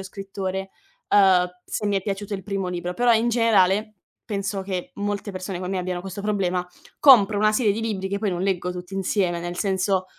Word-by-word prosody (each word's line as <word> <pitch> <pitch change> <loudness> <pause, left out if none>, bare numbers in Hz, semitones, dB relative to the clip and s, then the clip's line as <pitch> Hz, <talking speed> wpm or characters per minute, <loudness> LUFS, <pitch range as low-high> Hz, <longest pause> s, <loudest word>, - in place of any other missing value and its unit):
o - - -5
scrittore, 190 0 -5 0.4
ehm, 190 -3 +5 0.2
se 210 - -3
mi 205 -1 +1
è 195 - -1
piaciuto 200 +1 -4
il 195 - -5
primo 195 -1 -3
libro. 180 0 -3
Però 240 +5 +2
in 230 +2 +2
generale 215 -2 +3 0.3
penso 200 -1 -2
che 190 -2 -4
molte 205 0 -3
persone 185 0 -5
come 185 0 -4
me 190 - -1
abbiano 180 0 -3
questo 195 +1 -6
problema: 190 -4 -1 0.3
compro 220 -7 +7
una 215 +1 +3
serie 215 -2 +2
di 215 - -3
libri 205 -4 -2
che 200 - -1
poi 210 0 -1
non 180 0 -2
leggo 180 -2 0
tutti 180 +1 -8
insieme, 190 -2 0
nel 175 +1 -5
senso, 190 -1 0
195 Hz, 205 wpm, -24 LUFS, 185-205 Hz, 0.4 s, compro